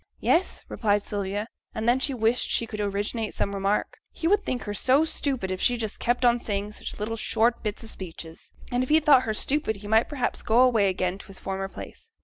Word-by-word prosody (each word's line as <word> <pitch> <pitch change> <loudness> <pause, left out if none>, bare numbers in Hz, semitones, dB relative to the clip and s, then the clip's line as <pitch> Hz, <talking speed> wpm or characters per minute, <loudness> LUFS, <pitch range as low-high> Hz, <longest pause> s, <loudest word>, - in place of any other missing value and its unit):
'Yes,' 350 +3 +1
replied 205 -2 +1
Sylvia, 205 +1 -3 0.3
and 220 +1 -2
then 245 +2 +4
she 270 - +1
wished 230 +1 +1
she 230 - +2
could 215 -2 -5
originate 205 +2 -2
some 200 - -1
remark; 195 +1 -1
he 330 - -2
would 410 +3 +3
think 250 -2 -3
her 205 - -4
so 260 +9 +3
stupid 265 -11 -2
if 185 - -3
she 245 - +3
just 220 -2 -4
kept 245 +1 +1
on 240 0 +4
saying 205 -2 -3
such - - -6
little 220 +2 -2
short 230 +2 +1
bits 210 +1 -4
of 225 - -5
speeches, 165 -3 -9 0.2
and 245 0 +1
if 255 - -2
he 310 +1 +6
thought 285 -4 +5
her - - +1
stupid 275 -2 0
he 200 +1 -10
might 220 +2 +3
perhaps 260 -5 -1
go 230 +2 +3
away 230 -6 +4
again 185 0 -1
to - - -12
his 195 - -10
former 195 0 -3
place. 455 - -11
220 Hz, 225 wpm, -26 LUFS, 200-250 Hz, 0.3 s, he